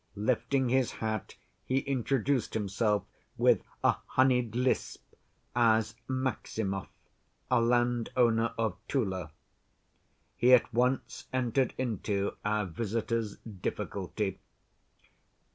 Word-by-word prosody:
Lifting 130 Hz, +4 st, +1 dB
his 130 Hz, -1 st, +2 dB
hat, 110 Hz, -2 st, -3 dB, 0.3 s
he 130 Hz, +6 st, 0 dB
introduced 135 Hz, -1 st, 0 dB
himself 105 Hz, 0 st, +1 dB, 0.3 s
with -, -, +4 dB, 0.2 s
a -, -, +4 dB
honeyed 125 Hz, -3 st, +2 dB
lisp 125 Hz, +1 st, 0 dB, 0.5 s
as 110 Hz, -2 st, +3 dB
Maximov, 110 Hz, -6 st, -2 dB, 0.6 s
a -, -, +5 dB
landowner 120 Hz, -1 st, +2 dB
of 110 Hz, -5 st, 0 dB
Tula. 95 Hz, -, -1 dB, 1.0 s
He 125 Hz, +2 st, +7 dB
at 120 Hz, -, 0 dB
once 125 Hz, +3 st, 0 dB
entered 130 Hz, 0 st, +1 dB
into 105 Hz, -5 st, -1 dB
our 105 Hz, -1 st, +1 dB
visitors' 110 Hz, +3 st, -2 dB
difficulty. 100 Hz, -1 st, -4 dB
115 Hz, 95 wpm, -30 LUFS, 105-125 Hz, 1.0 s, He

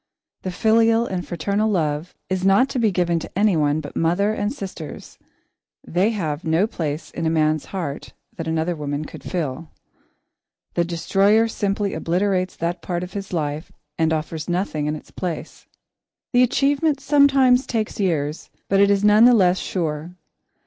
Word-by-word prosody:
The 185 Hz, -, -4 dB
filial 225 Hz, +4 st, +3 dB
and 185 Hz, -5 st, -4 dB
fraternal 200 Hz, +6 st, 0 dB
love 160 Hz, -3 st, -1 dB
is 185 Hz, -1 st, -2 dB
not 195 Hz, +8 st, +4 dB
to 260 Hz, -, -2 dB
be 225 Hz, -2 st, +3 dB
given 175 Hz, -3 st, +1 dB
to 165 Hz, -, -9 dB
anyone 155 Hz, -8 st, +2 dB
but 145 Hz, -, -9 dB
mother 180 Hz, +6 st, +1 dB
and 205 Hz, 0 st, -1 dB
sisters 190 Hz, -, -8 dB, 0.7 s
they 185 Hz, +5 st, +2 dB
have 165 Hz, -8 st, -3 dB
no 165 Hz, +4 st, +2 dB
place 155 Hz, -6 st, -4 dB
in 165 Hz, -1 st, -2 dB
a -, -, +3 dB
man's 155 Hz, -2 st, +1 dB
heart 165 Hz, -7 st, -5 dB, 0.2 s
that 165 Hz, -2 st, -5 dB
another 160 Hz, +2 st, 0 dB
woman 145 Hz, 0 st, -3 dB
could -, -, -10 dB
fill. 160 Hz, -2 st, -4 dB, 1.0 s
The 170 Hz, -, +2 dB
destroyer 195 Hz, +6 st, +2 dB
simply 205 Hz, -2 st, -1 dB
obliterates 185 Hz, +3 st, 0 dB
that 170 Hz, +1 st, -3 dB
part 175 Hz, -1 st, -3 dB
of 180 Hz, 0 st, -8 dB
his 200 Hz, -1 st, -6 dB
life 155 Hz, -2 st, -3 dB, 0.2 s
and 160 Hz, -1 st, +1 dB
offers 155 Hz, +1 st, -3 dB
nothing 175 Hz, -4 st, -1 dB
in 150 Hz, -, -1 dB
its 155 Hz, -, -12 dB
place. 175 Hz, -4 st, -6 dB, 0.7 s
The 245 Hz, -, +5 dB
achievement 280 Hz, +4 st, +2 dB
sometimes 275 Hz, -3 st, +4 dB
takes 220 Hz, -3 st, -2 dB
years, 155 Hz, -6 st, -1 dB, 0.2 s
but 195 Hz, -, +3 dB
it 200 Hz, 0 st, +5 dB
is 200 Hz, 0 st, +2 dB
none 210 Hz, +2 st, +6 dB
the 245 Hz, 0 st, +7 dB
less 185 Hz, -3 st, +3 dB
sure. 165 Hz, -1 st, -3 dB
180 Hz, 165 wpm, -22 LUFS, 160-210 Hz, 1.0 s, the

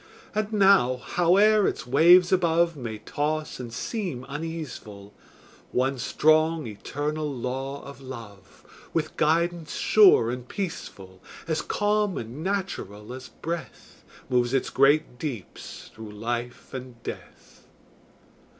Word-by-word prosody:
And 215 Hz, 0 st, -1 dB
now, 195 Hz, -, +5 dB
howe'er 195 Hz, -, +4 dB
its -, -, -3 dB
waves 175 Hz, +8 st, +6 dB
above 170 Hz, -2 st, +3 dB
May 115 Hz, -6 st, -5 dB
toss 150 Hz, +8 st, -3 dB
and 120 Hz, -2 st, -6 dB
seem 170 Hz, -, -4 dB
uneaseful, 140 Hz, -10 st, -7 dB, 0.6 s
One 130 Hz, +1 st, 0 dB
strong, 155 Hz, +3 st, +3 dB
eternal 145 Hz, +7 st, -3 dB
law 135 Hz, +2 st, -4 dB
of 140 Hz, -1 st, -11 dB
Love, 115 Hz, -8 st, -11 dB, 0.3 s
With -, -, -1 dB
guidance 170 Hz, +1 st, +1 dB
sure 185 Hz, -, +6 dB
and 125 Hz, 0 st, -6 dB
peaceful, 95 Hz, -, -6 dB, 0.3 s
As 160 Hz, -1 st, 0 dB
calm 210 Hz, -2 st, 0 dB
and 120 Hz, +7 st, -6 dB
natural 125 Hz, -, -3 dB
as 130 Hz, 0 st, -9 dB
breath, 170 Hz, 0 st, -7 dB, 0.2 s
Moves 125 Hz, 0 st, +1 dB
its 135 Hz, -, 0 dB
great 135 Hz, -2 st, +3 dB
deeps 125 Hz, -, -7 dB
through 110 Hz, -2 st, -9 dB
life 120 Hz, +4 st, -4 dB
and 125 Hz, -3 st, -8 dB
death. -, -, -10 dB
140 Hz, 115 wpm, -26 LUFS, 120-170 Hz, 0.6 s, waves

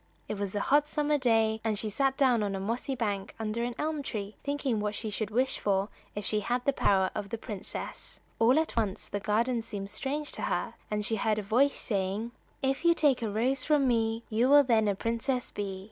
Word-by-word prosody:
It 210 Hz, -, -4 dB
was 200 Hz, -1 st, -3 dB
a 205 Hz, -, 0 dB
hot 290 Hz, +5 st, +3 dB
summer 300 Hz, -1 st, +1 dB
day, 225 Hz, -3 st, +2 dB
and 220 Hz, -2 st, 0 dB
she 215 Hz, 0 st, -3 dB
sat 270 Hz, +4 st, +1 dB
down 255 Hz, -5 st, +4 dB
on 200 Hz, -2 st, -1 dB
a -, -, -3 dB
mossy 235 Hz, +7 st, -2 dB
bank 205 Hz, -4 st, -2 dB
under 220 Hz, +1 st, -2 dB
an 240 Hz, 0 st, -3 dB
elm 305 Hz, 0 st, -1 dB
tree 210 Hz, -6 st, -5 dB
thinking 280 Hz, -5 st, -1 dB
what 210 Hz, 0 st, -2 dB
she 220 Hz, 0 st, -3 dB
should 210 Hz, 0 st, -2 dB
wish 255 Hz, +5 st, 0 dB
for 195 Hz, 0 st, +1 dB, 0.3 s
if 205 Hz, -1 st, -4 dB
she 215 Hz, -, +1 dB
had 245 Hz, +4 st, -1 dB
the 280 Hz, -, +3 dB
power 190 Hz, -6 st, +2 dB
of 200 Hz, -, -4 dB
the 230 Hz, -, -3 dB
princess. 215 Hz, -3 st, -7 dB, 0.2 s
All 240 Hz, +5 st, +5 dB
at 320 Hz, 0 st, 0 dB
once 215 Hz, -3 st, -1 dB
the 205 Hz, -, -3 dB
garden 230 Hz, +4 st, +1 dB
seemed 205 Hz, -3 st, -6 dB
strange 290 Hz, +2 st, -3 dB
to -, -, -6 dB
her, -, -, -1 dB, 0.2 s
and 210 Hz, 0 st, -1 dB
she 225 Hz, -, 0 dB
heard 215 Hz, +1 st, +1 dB
a 215 Hz, -, -2 dB
voice 255 Hz, +7 st, +3 dB
saying: 200 Hz, +2 st, -2 dB, 0.3 s
"If 270 Hz, +3 st, 0 dB
you 340 Hz, 0 st, +5 dB
take 280 Hz, -6 st, +3 dB
a 225 Hz, -, -1 dB
rose 255 Hz, +6 st, 0 dB
from 295 Hz, -2 st, +3 dB
me 225 Hz, -1 st, +1 dB
You 230 Hz, +4 st, +2 dB
will 290 Hz, 0 st, +8 dB
then 225 Hz, -4 st, +3 dB
a 200 Hz, -, +2 dB
princess 235 Hz, +4 st, -2 dB
be." 195 Hz, -2 st, -4 dB
225 Hz, 225 wpm, -29 LUFS, 210-265 Hz, 0.3 s, will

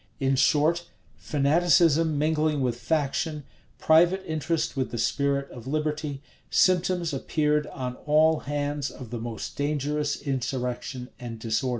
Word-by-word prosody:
In 135 Hz, 0 st, +2 dB
short, 160 Hz, +5 st, +2 dB, 0.3 s
fanaticism 160 Hz, +1 st, +3 dB
mingling 155 Hz, -1 st, +1 dB
with 125 Hz, -2 st, 0 dB
faction, 150 Hz, +3 st, -1 dB, 0.3 s
private 175 Hz, +4 st, +4 dB
interest 160 Hz, 0 st, -1 dB
with 130 Hz, -2 st, -1 dB
the 120 Hz, -, -5 dB
spirit 140 Hz, +3 st, 0 dB
of 120 Hz, 0 st, -10 dB
liberty, 150 Hz, -1 st, -2 dB, 0.3 s
symptoms 180 Hz, -2 st, +2 dB
appeared 150 Hz, +1 st, 0 dB
on 125 Hz, -2 st, -5 dB
all 155 Hz, +1 st, +4 dB
hands 145 Hz, 0 st, -2 dB
of 125 Hz, -4 st, -10 dB
the 120 Hz, -, -4 dB
most 115 Hz, -2 st, -6 dB
dangerous 145 Hz, +1 st, -1 dB
insurrection 125 Hz, -1 st, -3 dB
and 120 Hz, -2 st, -6 dB
disorder. 110 Hz, +3 st, -1 dB
145 Hz, 125 wpm, -26 LUFS, 130-155 Hz, 0.3 s, private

